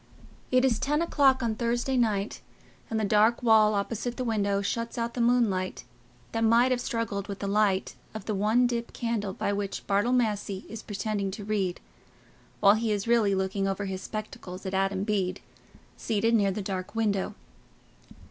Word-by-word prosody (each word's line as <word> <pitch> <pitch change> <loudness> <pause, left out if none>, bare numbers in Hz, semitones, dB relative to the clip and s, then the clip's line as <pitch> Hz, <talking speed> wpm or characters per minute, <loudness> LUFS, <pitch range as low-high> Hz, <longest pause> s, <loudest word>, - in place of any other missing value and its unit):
It 255 0 +4
is 240 -4 +2
ten 295 +2 +1
o'clock 270 -6 +3
on 230 -2 +1
Thursday 240 +3 -1
night, 215 -4 0 0.5
and 220 - -1
the 215 - +1
dark 215 +4 +3
wall 215 -2 +5
opposite 230 +4 -2
the 255 - -2
window 200 -4 0
shuts 230 +4 -3
out 235 0 -2
the 245 - -2
moonlight 230 -6 +1 0.5
that 225 0 -1
might 235 +3 +4
have 250 -1 +1
struggled 220 -5 -3
with 200 -2 -5
the 200 - -5
light 200 -1 +1 0.2
of 220 - -6
the 215 - -1
one 215 +5 +3
dip 235 -1 -2
candle 225 -4 -2
by 200 - -2
which 200 -1 -4
Bartle 205 +4 +1
Massey 210 -5 0
is 225 -1 -7
pretending 205 -1 -2
to 200 +1 -7
read, 195 -4 -1 0.8
while 200 0 +7
he 220 0 0
is 205 +1 -1
really 225 -4 +3
looking 190 +1 -1
over 195 +1 -2
his 190 -1 -4
spectacles 195 -3 -7
at 190 - -4
Adam 195 0 0
Bede, 195 -3 -1 0.6
seated 225 +1 0
near 205 -3 +4
the 195 +1 -3
dark 190 +1 -4
window. 210 -4 0
215 Hz, 175 wpm, -28 LUFS, 200-235 Hz, 0.8 s, while